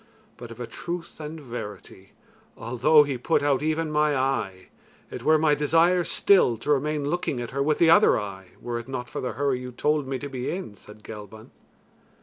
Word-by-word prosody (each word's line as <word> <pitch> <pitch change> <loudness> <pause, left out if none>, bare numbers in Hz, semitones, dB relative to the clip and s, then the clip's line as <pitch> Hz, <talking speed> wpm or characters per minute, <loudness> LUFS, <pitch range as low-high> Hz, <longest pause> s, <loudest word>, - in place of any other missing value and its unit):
But 120 - -10
of 115 - -11
a 120 - -4
truth 170 +11 -7
and 155 +1 -7
verity, 105 -7 -9 0.4
although 125 +6 +4
he 140 -4 -4
put 160 +4 +1
out 145 -2 +2
even 155 +1 -1
my 150 -1 +2
eye, 130 -9 -2 0.4
it - - -6
were 155 0 +4
my 155 -1 +3
desire 165 +5 +3
still 170 - +3
to 130 +7 -2
remain 145 +1 0
looking 150 -5 -2
at 120 -1 -5
her 140 - -2
with 150 +2 +1
the 165 -1 +5
other 185 - +5
eye, 95 -2 -7
were 120 -1 -4
it 120 - -10
not 125 -2 -5
for - - -4
the 125 - -3
hurry 140 -2 0
you 125 0 -7
told 150 +3 0
me 135 0 -2
to 145 - -6
be 130 -2 -4
in," 180 - -5
said 105 +1 -16
Gelban. 110 0 -10
135 Hz, 200 wpm, -25 LUFS, 120-155 Hz, 0.4 s, the